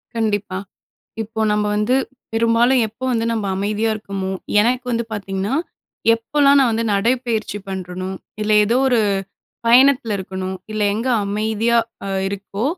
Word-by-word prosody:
கண்டிப்பா. 205 -4 -1 0.7
இப்போ 220 +1 -6
நம்ம 210 0 +1
வந்து 210 +4 +2 0.4
பெரும்பாலும் 230 +3 +3
எப்போ 225 +5 -9
வந்து 230 -1 0
நம்ப 220 -3 -2
அமைதியா 210 +3 0
இருக்கமோ, 195 -3 -4 0.3
எனக்கு 245 +3 +1
வந்து 235 0 0
பாத்தீங்கன்னா, 195 +1 -2 0.6
எப்பலாம் 280 +5 +3
நான் 265 -3 +4
வந்து 225 +1 0
நடைப்பயிற்சி 225 0 0
பண்றனோ. 185 -1 -5 0.3
இல்ல 215 0 +1
எதோ 230 +4 +1
ஒரு 245 -3 +3 0.7
பயணத்தில 245 -2 +5
இருக்கனோ, 190 0 -5 0.2
இல்ல 215 0 -1
எங்க 230 +5 -2 0.2
அமைதியா 220 +3 +1 0.3
அ - - -3 0.2
இருக்கோ, 200 +2 -4
220 Hz, 130 wpm, -20 LUFS, 200-235 Hz, 0.7 s, பயணத்தில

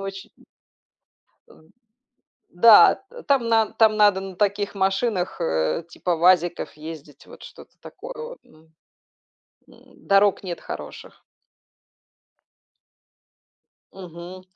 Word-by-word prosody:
очень, 195 0 -8
м - - -22 1.1
Ам, 155 - -21 0.8
да, 210 +5 +6 0.3
там 270 -5 +1
нан 225 -1 +1
там 220 -1 +4
надо 205 -2 +3
на 190 -1 -9
таких 200 0 -1
машинах, 195 0 -1
э, 80 - -1
типа 175 -1 -3
"ВАЗиков" 175 0 +1
ездить, 155 -1 -12
вот - - -15
что-то - - -15
такое - - -11
вот, 475 +1 -9
мгм. 160 +1 -24 1.0
М, - - -22
дорог 200 0 +3
нет 180 -3 -7
хороших. - - -10 2.7
Мгм. 180 0 -11
190 Hz, 105 wpm, -22 LUFS, 170-210 Hz, 2.7 s, да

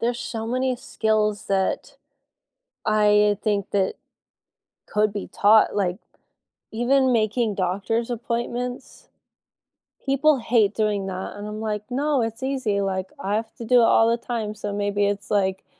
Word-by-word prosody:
There's 235 +1 -1
so 225 -1 -4
many 255 +2 0
skills 215 -3 -1
that 190 -1 -1 0.9
I 210 -1 +4
think 205 -3 -1
that 195 -2 +1 0.9
could 210 0 +1
be 205 - -5
taught, 215 +1 +4
like, 185 -3 0 0.7
even 255 +3 +2
making 220 -1 +1
doctor's 200 +6 -1
appointments. 240 +1 -4 1.0
People 275 +2 +3
hate 225 -3 +2
doing 210 -3 0
that, 190 0 -5
and 205 +1 -6
I'm 215 +1 -6
like, 210 -1 -3
"No, 280 +2 +1
it's 225 +1 -3
easy," 260 -7 -1
like, 190 -1 -2
I 200 +2 -1
have 220 0 -4
to 235 - -7
do 245 +2 +5
it - - +5
all 225 0 +5
the 235 - +1
time, 230 -3 -4
so 210 -1 -5
maybe 205 0 0
it's, 205 0 -3
like, 190 -2 0
215 Hz, 150 wpm, -23 LUFS, 205-235 Hz, 1.0 s, do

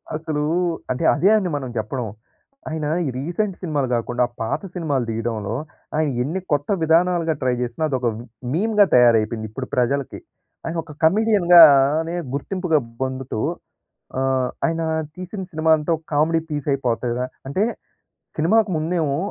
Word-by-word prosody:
అసలు, 155 -2 -2 0.5
అంటే 130 +6 -2
అదే 190 - +3
అని 185 -4 -1
మనం 130 -3 -5
చెప్పడం. 115 +2 -3 0.6
ఆయన 160 -1 -3 0.2
ఈ - - -1
రీసెంట్ 175 +7 -2
సినిమాలు 150 -6 -1
కాకుండా, 120 +1 0 0.2
పాత 115 - -1
సినిమాలు 145 -8 -1
తీయడంలో 110 -1 -3 0.4
ఆయన 155 -2 +2
ఎన్ని 165 +8 -2
కొత్త 145 0 0
విధానాలుగా 165 0 +3
ట్రై 130 -1 +1
చేసినా, 125 +6 -3
అదొక 130 -3 0 0.5
మీమ్‌గా 210 +3 +3
తయారైపోయింది 115 -2 +3
ఇప్పుడు 130 +3 -5
ప్రజలకి. 130 +2 0 0.5
ఆయన 165 +1 -3
ఒక 165 - -12
కమెడియన్‌గానే 170 -6 +6 0.2
గుర్తింపుగా 175 +1 0 0.2
పొందుతూ 130 -3 -4 0.8
ఆహ్, 130 -1 +1 0.2
ఆయన 165 0 -1 0.3
తీసిన 185 +2 -6
సినిమా 160 -1 -1
అంతా 150 +3 -3
ఒక 160 - -13
కామెడీ 160 +3 +3
పీస్ 145 -1 -4
అయిపోతది. 125 -2 -1 0.2
అంటే 140 +9 -1 0.8
సినిమాకు 205 +6 +3
ముందేమో 155 -3 0
150 Hz, 130 wpm, -22 LUFS, 130-170 Hz, 0.8 s, కమెడియన్‌గానే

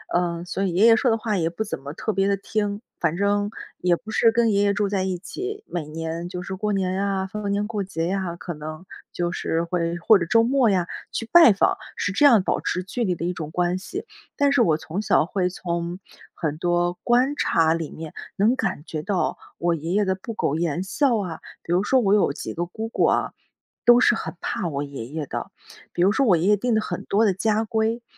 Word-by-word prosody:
嗯， 175 -1 0
所 190 +2 -3
以 185 -3 0
爷 195 +5 +4
爷 230 -1 +8
说 235 +1 +2
的 225 - +2
话 215 -1 -2
也 165 -1 +1
不 175 +6 -3
怎 - - -4
么 140 - -7
特 220 - -3
别 195 0 +1
地 200 0 +1
听， 205 +1 -2 0.2
反 165 0 0
正， 205 +1 +1 0.3
也 180 -1 +3
不 215 +5 -10
是 225 0 +4
跟 230 -1 +2
爷 200 0 +2
爷 205 - +3
住 205 0 0
在 195 -1 -1
一 185 -1 -1
起。 390 - -6
每 165 -4 -4
年 165 +2 -5
就 180 -1 -5
是 190 +1 -5
过 210 +2 -2
年 190 -2 0
呀、 195 0 -1
逢 205 +1 -4
年 205 +1 0
过 210 -3 -2
节 165 -3 -3
呀， 185 -2 -2
可 175 0 -6
能， 155 +3 -8 0.3
就 175 0 -2
是 165 -2 -1
会 170 0 -1
或 200 +4 +5
者 170 - -1
周 230 +5 +4
末 255 -1 +3
呀， 185 -3 +1 0.2
去 225 - -4
拜 340 -8 +9
访， 195 - +2 0.2
是 180 - -1
这 245 +10 +3
样 225 -8 +5
保 - - 0
持 180 - -2
距 235 +6 -3
离 185 -5 0
的 170 - -4
一 180 - -1
种 155 -3 -6
关 180 +2 0
系。 390 - -6 0.3
但 285 -1 +3
是 280 -3 +4
我 160 -8 +3
从 165 +5 -4
小 205 - +3
会 180 0 -1
从， 170 0 -4 0.4
很 155 -3 -2
多 175 0 +1
观 250 +4 +3
察 165 - +2
里 165 -2 -3
面 160 -1 -8 0.2
能 215 +5 +3
感 150 - -2
觉 155 -3 -4
到， 190 +2 -1 0.2
我 170 0 +1
爷 165 +2 -5
爷 205 0 +2
的 190 - +1
不 210 +5 -7
苟 140 - 0
言 170 +1 -1
笑 235 +6 +1
啊。 180 -6 -4 0.2
比 170 - -2
如 185 - +3
说 260 +5 +3
我 200 -4 +2
有 205 -9 +3
几 - - -6
个 175 - -2
姑 220 +5 -5
姑 - - +1
啊， - - +1 0.5
都 240 0 +8
是 245 - +5
很 225 - -4
怕 180 - -2
我 145 -2 -2
爷 140 -5 -7
爷 150 +3 -4
的， - - -5 0.4
比 175 - 0
如 195 - +5
说 270 +5 +2
我 180 -5 +5
爷 180 +5 +1
爷 210 - +5
定 240 +2 0
的 220 - +2
很 180 -4 -5
多 215 +3 +2
的 200 - +3
家 215 +3 +1
规。 225 +1 -1
190 Hz, 260 characters per minute, -23 LUFS, 170-215 Hz, 0.5 s, 拜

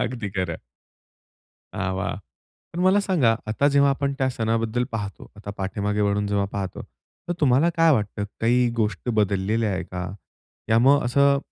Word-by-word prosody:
अगदी 120 -4 -3
खरं. 85 -3 -2 1.1
हां, 95 -1 -2
वा. 95 - -2 0.6
पण 175 - -4
मला 190 +3 +4
सांगा, 160 - +2
आता 125 +7 +2
जेव्हा 140 0 +4
आपण 140 0 -1
त्या 130 - +1
सणाबद्दल 115 0 -1
पाहतो. 100 -3 -6
आता 105 0 -8
पाठीमागे 105 +2 -2
वळून 100 0 +1
जेव्हा 100 -1 0
पाहतो, 95 -2 -4 0.5
तर 175 - +1
तुम्हाला 145 +4 +4
काय 165 0 +5
वाटतं? 105 -4 -1 0.2
काही 120 +2 +3
गोष्टी 110 +2 -1
बदललेल्या 105 +1 +1
आहेत 95 - -3
का? 90 -1 -4 0.7
या 115 - +5
मग 140 +4 +5
असं 140 +3 +3
115 Hz, 155 wpm, -24 LUFS, 100-140 Hz, 1.1 s, काय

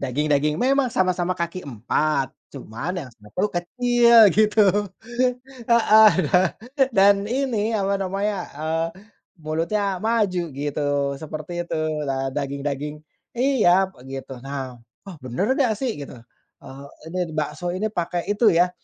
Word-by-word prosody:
Daging-daging 150 +3 0
memang 265 - +2
sama-sama 185 -3 0
kaki 170 +1 -3
empat, 135 +3 -1 0.2
cuman 115 +11 -6
yang 130 - -12
satu 105 - -4
kecil 235 +4 +5
gitu, 215 +2 +4 1.1
heeh, 220 -2 +7 0.2
dan 185 0 +5 0.5
dan 200 +1 +7
ini 230 -4 0
apa 200 -1 0
namanya, 195 +2 -1 0.2
eee, 160 +2 -1 0.6
mulutnya 180 +5 -1
maju 210 -5 +1
gitu 145 +1 -3 0.4
seperti 155 +2 -7
itu, 165 - -3 0.3
eee, 135 0 -1
daging-daging. 140 +1 -3 0.4
Iya 210 -8 +3
begitu. 135 0 -9
Nah, 135 -2 -6 0.3
"Oh, 195 -3 -9
bener 130 - -1
enggak 250 -6 +3
sih?" 255 +1 -2
Gitu. 140 - -8 0.5
"Eee, 135 +1 -11 0.3
ini 185 - -3 0.2
bakso 155 +3 -3
ini 195 +4 -1
pakai 175 -2 -2
itu 215 +2 +3
ya, 175 +2 +3
175 Hz, 125 wpm, -23 LUFS, 145-210 Hz, 1.1 s, heeh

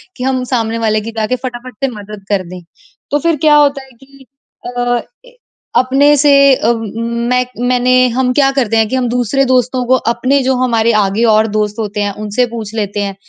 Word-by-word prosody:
कि 250 - -6
हम 260 -1 -1
सामने 230 -2 -1
वाले 215 -1 0
की 230 +2 -7
जाके 220 +3 0
फटाफट 250 0 -7
से - - +3
मदद 205 -1 -10
कर 195 -2 0
दें। 180 -1 -9 0.5
तो 290 - +1
फिर 335 +1 +1
क्या 300 -1 +6
होता 280 -2 +2
है 265 - -19
कि 275 0 -19 0.4
अ 245 -1 -1 0.2
ए, - - -20 0.4
अपने 275 +3 +3
से 290 +1 +4 0.2
अ, 235 0 +1
म 225 -2 -5 0.4
मैं 250 0 +1 0.2
मैंने 255 0 +3
हम 250 +1 0
क्या 275 -1 +3
करते 235 -5 0
हैं 220 -1 +2
कि 260 - -2
हम 255 -1 0
दूसरे 250 +3 0
दोस्तों 255 0 0
को, 260 +2 +3
अपने 255 +3 0
जो 260 0 +1
हमारे 230 -2 +2
आगे 200 +4 -1
और 215 +1 +3
दोस्त 210 -1 -1
होते 210 -1 -3
हैं, 200 0 -2
उनसे 215 +4 0
पूछ 220 -1 -6
लेते 205 -1 -2
हैं, 195 -1 -4
245 Hz, 210 wpm, -14 LUFS, 220-260 Hz, 0.5 s, क्या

